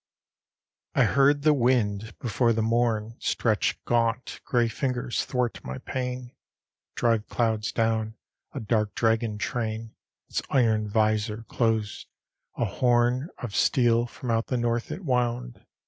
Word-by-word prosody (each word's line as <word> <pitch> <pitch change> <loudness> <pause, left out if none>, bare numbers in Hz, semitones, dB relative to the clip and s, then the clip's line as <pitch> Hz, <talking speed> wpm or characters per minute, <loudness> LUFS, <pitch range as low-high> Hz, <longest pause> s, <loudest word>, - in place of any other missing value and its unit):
LX - - +1
I - - +6
heard 140 +1 +3
the 155 0 +5
wind, 115 -5 +1
before 115 +1 +1
the 110 0 0
morn 115 -1 0
Stretched 110 -3 0
gaunt, 115 +1 0
gray 120 -2 +2
fingers 125 +1 -2
'thwart 125 -2 -2
my 65 +1 -5
pane, 125 -1 -4 0.6
Drive 115 -2 +1
clouds 110 -2 0
down, 110 -1 0 0.4
a 140 - -5
dark 110 -2 0
dragon 115 -1 +1
train; 110 0 -3 0.3
Its - - -2
iron 110 -5 +2
visor 110 +1 +1
closed, 110 -3 -1 0.5
a 120 - +1
horn 120 - +2
Of 110 -5 -4
steel 120 -2 +3
from 120 0 -5
out 115 0 0
the 125 - -1
north 120 0 -1
it 190 - -6
wound. 125 -2 -1
115 Hz, 135 wpm, -26 LUFS, 110-125 Hz, 0.6 s, I